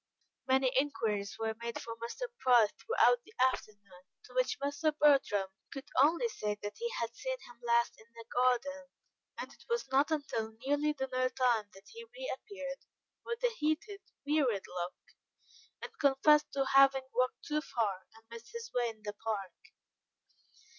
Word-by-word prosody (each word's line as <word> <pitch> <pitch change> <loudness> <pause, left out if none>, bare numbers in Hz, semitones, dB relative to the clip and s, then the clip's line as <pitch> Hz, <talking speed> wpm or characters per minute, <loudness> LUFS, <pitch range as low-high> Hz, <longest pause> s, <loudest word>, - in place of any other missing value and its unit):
Many 260 -1 +3
inquiries 215 -8 -1
were 225 0 -1
made 235 0 -4
for 230 -1 -6
Mr. 235 - -7 0.2
Price 240 -5 +5
throughout 480 +1 +4
the 430 - -19 0.2
afternoon, 200 -4 -11 0.2
to - - -16
which - - +1
Mr. 285 +2 0
Bertram 270 -10 +4 0.2
could 275 +1 -7
only 335 - +4
say 210 - -3
that 205 - -5
he 470 0 -1
had 230 0 -3
seen - - -3
him 240 0 -15
last 235 0 +3
in 220 - -18
the 230 0 -10
garden, 260 +3 +1 0.5
and - - -6
it - - -19
was 470 0 0
not 275 +3 +4
until 230 -8 -2
nearly 290 +2 +2
dinner 255 -2 -1
time 240 -5 +1
that 195 +1 -16
he 460 0 -10
reappeared, 400 - -5 0.4
with 465 +1 -5
a 485 -2 +3
heated, 360 +7 -1 0.2
wearied 275 -9 +1
look, 180 0 -4 0.9
and - - -6
confessed 290 +2 +4
to 275 -1 +1
having 270 -1 +6
walked 255 0 0
too 300 0 0
far 205 -10 -2
and 225 - -17
missed 230 0 -10
his 465 0 -6
way 240 -1 +1
in 220 -1 -12
the 205 0 -4
park. 205 -4 -4
265 Hz, 160 wpm, -33 LUFS, 225-300 Hz, 0.9 s, having